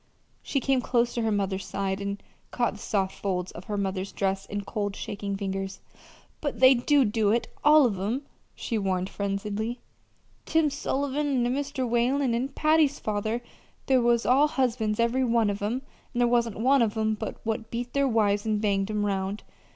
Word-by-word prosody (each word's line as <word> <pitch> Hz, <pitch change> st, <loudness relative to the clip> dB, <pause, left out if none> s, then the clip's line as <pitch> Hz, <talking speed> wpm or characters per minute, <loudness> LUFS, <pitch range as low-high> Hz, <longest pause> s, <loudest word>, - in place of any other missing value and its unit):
She 275 Hz, -, -1 dB
came 265 Hz, -1 st, +1 dB
close 240 Hz, -1 st, +1 dB
to 235 Hz, -, -1 dB
her 225 Hz, -1 st, +1 dB
mother's 195 Hz, -2 st, -1 dB
side 195 Hz, 0 st, -3 dB
and 200 Hz, 0 st, -4 dB, 0.3 s
caught 240 Hz, -4 st, 0 dB
the 205 Hz, -, -11 dB
soft 195 Hz, -2 st, -1 dB
folds 185 Hz, -2 st, -2 dB
of 175 Hz, -, -10 dB
her 210 Hz, -, -3 dB
mother's 195 Hz, -1 st, -2 dB
dress 195 Hz, 0 st, -1 dB
in 205 Hz, 0 st, -3 dB
cold, 205 Hz, -1 st, -3 dB
shaking 200 Hz, -1 st, -4 dB
fingers. 195 Hz, -1 st, -4 dB, 0.6 s
"But 285 Hz, -6 st, -3 dB
they 260 Hz, +1 st, +8 dB
do 270 Hz, +2 st, +3 dB
do 210 Hz, -1 st, +1 dB
it 230 Hz, +3 st, +1 dB
all 300 Hz, -1 st, +7 dB
of 205 Hz, -6 st, 0 dB
'em," 225 Hz, +9 st, -2 dB, 0.3 s
she 230 Hz, -3 st, -2 dB
warned 190 Hz, -1 st, -1 dB
frenziedly. 210 Hz, +4 st, -3 dB, 0.7 s
"Tim 320 Hz, -2 st, +2 dB
Sullivan, 280 Hz, -2 st, -1 dB
an' 245 Hz, -, +1 dB
Mr. 275 Hz, -2 st, -2 dB
Whalen, 245 Hz, +2 st, +1 dB
an' 245 Hz, +3 st, -1 dB
Patty's 310 Hz, 0 st, +3 dB
father 215 Hz, +3 st, -2 dB, 0.4 s
they 265 Hz, -1 st, +4 dB
was 235 Hz, -1 st, +2 dB
all 275 Hz, +4 st, +5 dB
husbands, 235 Hz, -6 st, 0 dB
every 235 Hz, +3 st, +2 dB
one 230 Hz, -4 st, +2 dB
of 200 Hz, -, -5 dB
'em; 235 Hz, +6 st, -2 dB, 0.3 s
and -, -, 0 dB
there 240 Hz, -, +4 dB
wasn't 235 Hz, -3 st, +1 dB
one 265 Hz, +3 st, +4 dB
of 225 Hz, -1 st, +1 dB
'em 220 Hz, 0 st, +1 dB
but 215 Hz, 0 st, -5 dB
what 225 Hz, 0 st, -3 dB
beat 240 Hz, +1 st, -4 dB
their 280 Hz, 0 st, +2 dB
wives 205 Hz, -4 st, +2 dB
and 215 Hz, -1 st, 0 dB
banged 200 Hz, -1 st, 0 dB
'em 210 Hz, -1 st, 0 dB
'round. 195 Hz, 0 st, -2 dB
225 Hz, 190 wpm, -27 LUFS, 200-255 Hz, 0.7 s, they